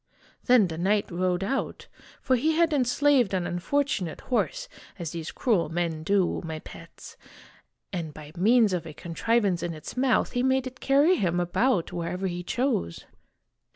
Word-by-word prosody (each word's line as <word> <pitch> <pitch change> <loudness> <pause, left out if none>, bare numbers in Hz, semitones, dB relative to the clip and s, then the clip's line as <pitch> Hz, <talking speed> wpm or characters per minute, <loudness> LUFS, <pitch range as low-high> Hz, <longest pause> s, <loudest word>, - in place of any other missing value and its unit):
Then 245 -6 +5
the 160 -1 -6
knight 200 +3 +1
rode 180 +1 0
out 270 +7 -3 0.4
for 260 - +3
he 305 +6 +1
had 330 0 +2
enslaved 255 -4 +3
an 180 -2 -1
unfortunate 185 - -1
horse, - - -1 0.3
as 170 -4 -5
these 165 -2 -5
cruel 205 - +1
men 165 -1 -2
do, 190 +2 +1
my 160 -1 -5
pets, - - -12 0.8
and 165 -4 -3
by 150 0 -11
means 215 +3 +4
of 180 - -2
a - - -8
contrivance 190 +2 0
in 170 -1 -3
its 155 - -9
mouth, 255 0 +2
he 245 - -1
made 260 0 +2
it 255 0 -8
carry 290 +7 +4
him 175 - 0
about 180 +2 +1
wherever 175 +2 -3
he 175 -1 -3
chose. 210 - -2
195 Hz, 160 wpm, -26 LUFS, 170-255 Hz, 0.8 s, Then